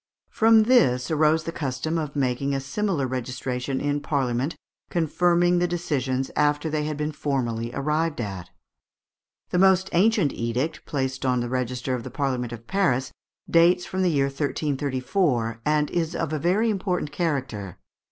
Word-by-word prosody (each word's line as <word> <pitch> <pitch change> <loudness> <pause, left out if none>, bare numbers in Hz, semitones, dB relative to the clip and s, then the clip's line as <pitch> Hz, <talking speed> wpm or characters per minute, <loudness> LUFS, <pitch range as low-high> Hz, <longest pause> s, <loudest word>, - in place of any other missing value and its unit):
From 225 0 +5
this 165 - +3
arose 155 +1 +3
the 165 - -4
custom 155 +2 -2
of 150 -2 -5
making 135 0 0
a - - 0
similar 155 +2 -1
registration 130 +1 -3
in 145 0 0
Parliament, 140 0 -1 0.3
confirming 175 +1 +2
the 175 - +2
decisions 135 -7 -2
after 150 +1 +1
they 150 -1 -1
had 150 -1 -3
been 150 +1 -2
formally 120 -6 -2
arrived 150 +2 0
at. 95 -6 -5 1.0
The 180 - +2
most 190 0 +4
ancient 190 -4 +3
edict 125 +7 -2
placed 130 -2 -2
on 125 -1 +2
the 120 0 -2
register 125 0 -2
of 125 - -2
the 130 - -7
Parliament 130 -2 -2
of 115 -1 -8
Paris 135 -9 +1 0.4
dates 175 +2 +4
from 190 - -3
the 185 - +3
year 140 -4 +2
1334, 140 - -1
and 150 -1 +2
is 170 -1 -1
of 160 -2 -2
a 155 - -1
very 200 +8 +2
important 185 -6 -2
character. 130 - -3
145 Hz, 155 wpm, -25 LUFS, 130-170 Hz, 1.0 s, From